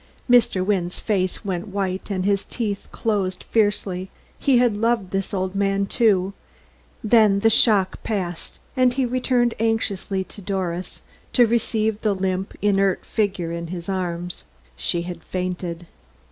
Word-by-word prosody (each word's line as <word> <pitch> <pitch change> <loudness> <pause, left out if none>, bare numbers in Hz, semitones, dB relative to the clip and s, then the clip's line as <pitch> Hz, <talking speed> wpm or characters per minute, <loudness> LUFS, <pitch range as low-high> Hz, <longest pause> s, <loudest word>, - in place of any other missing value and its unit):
Mr. 230 -7 +4
Wynne's 185 -3 0
face 190 -1 -1
went 185 +1 -2
white, 190 -1 -3
and 190 -2 -1
his 200 -1 +2
teeth 210 -4 -3
closed 195 -5 -1
fiercely; 200 -4 +1 0.3
he 270 -3 +4
had 240 -3 +3
loved 225 -3 0
this 195 0 -2
old 190 -1 -1
man, 195 0 +1
too; 195 -4 +2 0.7
then 215 -3 +5
the 225 - +5
shock 205 -4 +3
passed 180 -6 -4 0.2
and 255 -2 +3
he 265 -1 +2
turned 245 -2 +2
anxiously 205 -4 0
to 205 - -12
Doris 185 -2 -3 0.3
to 245 - +6
receive 220 -1 0
the 210 -2 +1
limp, 190 0 -2
inert 195 -2 +2
figure 195 -6 -1
in 170 0 -4
his 170 0 -6
arms. 180 -2 -3 0.3
She 170 - -1
had 180 0 -7
fainted. 180 -2 -4
195 Hz, 145 wpm, -23 LUFS, 185-220 Hz, 0.7 s, to